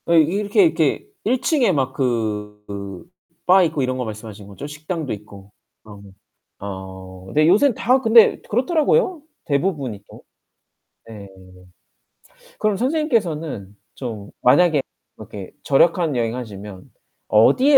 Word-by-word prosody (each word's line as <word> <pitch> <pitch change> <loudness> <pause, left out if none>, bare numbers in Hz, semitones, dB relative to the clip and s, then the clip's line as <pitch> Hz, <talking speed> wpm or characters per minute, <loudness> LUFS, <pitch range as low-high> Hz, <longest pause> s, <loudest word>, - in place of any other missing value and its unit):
아이 170 -1 +5
이렇게 200 - +2
이렇게 325 - +1 0.2
1 245 +4 0
층에 280 - +2
막 135 -5 -1
그 105 - -4 0.4
바 185 +1 +6
있고 155 -4 0
이런 130 0 -1
거 125 - -3
말씀하시는 110 -2 -8
거죠? 100 +7 -9
식당도 150 0 -5
있고. 100 -1 -12 0.3
아 105 -2 -12
네. 100 - -14 0.5
어 95 -1 -9
네. 155 +1 +4
요샌 225 +10 +4
다 255 +3 +2
근데 225 -2 +6
그렇더라고요, 320 - +1 0.2
대부분이 140 - -1
또. - - -13 0.9
네네. 105 -3 -10 1.3
그럼 210 -2 +1
선생님께서는 185 - -1 0.2
좀 110 -6 -7
만약에 155 +3 +4 0.3
그렇게 100 -3 -10
절약한 160 +2 +3
여행 115 -1 -1
하시면 105 -5 -9 0.4
어디에 255 - +5
135 Hz, 265 characters per minute, -21 LUFS, -, 1.3 s, 바